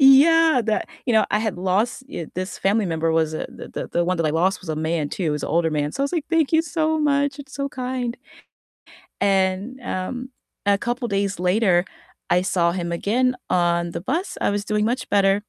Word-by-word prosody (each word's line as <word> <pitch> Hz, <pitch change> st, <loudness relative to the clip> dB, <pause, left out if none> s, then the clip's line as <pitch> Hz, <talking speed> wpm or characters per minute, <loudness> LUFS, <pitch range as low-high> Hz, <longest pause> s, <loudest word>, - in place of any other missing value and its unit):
Yeah, 285 Hz, +1 st, +6 dB
that, 215 Hz, -, 0 dB, 0.2 s
you 240 Hz, -, +2 dB
know, 220 Hz, -, +5 dB
I 210 Hz, -, +2 dB
had 215 Hz, -5 st, -2 dB
lost, 200 Hz, +8 st, 0 dB
uh, 170 Hz, -, -4 dB
this 185 Hz, +2 st, -4 dB
family 205 Hz, +1 st, +2 dB
member 165 Hz, -1 st, 0 dB
was 160 Hz, -1 st, +1 dB
a -, -, -3 dB
the -, -, -10 dB
the -, -, -5 dB
the 175 Hz, -, 0 dB
one 180 Hz, +1 st, 0 dB
that 165 Hz, -, +1 dB
I 150 Hz, -, +2 dB
lost 180 Hz, +5 st, +1 dB
was 180 Hz, -, -12 dB
a 155 Hz, -, -1 dB
man 160 Hz, -1 st, -1 dB
too, -, -, -4 dB
he 155 Hz, -, +1 dB
was 150 Hz, -1 st, -2 dB
an -, -, -4 dB
older 165 Hz, +1 st, +2 dB
man, 150 Hz, -1 st, -1 dB
so 275 Hz, -, -2 dB
I -, -, +3 dB
was, 280 Hz, -, -3 dB
like, 325 Hz, -4 st, -1 dB
"Thank 325 Hz, -2 st, +2 dB
you 320 Hz, -, +5 dB
so 315 Hz, 0 st, 0 dB
much. 285 Hz, -1 st, +1 dB
It's 275 Hz, -1 st, -10 dB
so 280 Hz, 0 st, -2 dB
kind." 250 Hz, -2 st, -3 dB, 1.1 s
And, 195 Hz, +5 st, +1 dB
um, 245 Hz, +4 st, -4 dB, 0.4 s
a 200 Hz, -1 st, +4 dB
couple 240 Hz, +2 st, -2 dB
days 200 Hz, -2 st, -1 dB
later, 180 Hz, -1 st, +3 dB, 0.4 s
I 180 Hz, -, +4 dB
saw 175 Hz, -2 st, +1 dB
him 175 Hz, -1 st, -3 dB
again 245 Hz, +9 st, +1 dB
on 170 Hz, -1 st, +1 dB
the 170 Hz, -, -5 dB
bus, 320 Hz, -, -2 dB
I -, -, +2 dB
was 205 Hz, 0 st, -2 dB
doing 210 Hz, 0 st, +1 dB
much 245 Hz, +2 st, -1 dB
better. 195 Hz, 0 st, +3 dB
200 Hz, 225 wpm, -22 LUFS, 175-255 Hz, 1.1 s, Yeah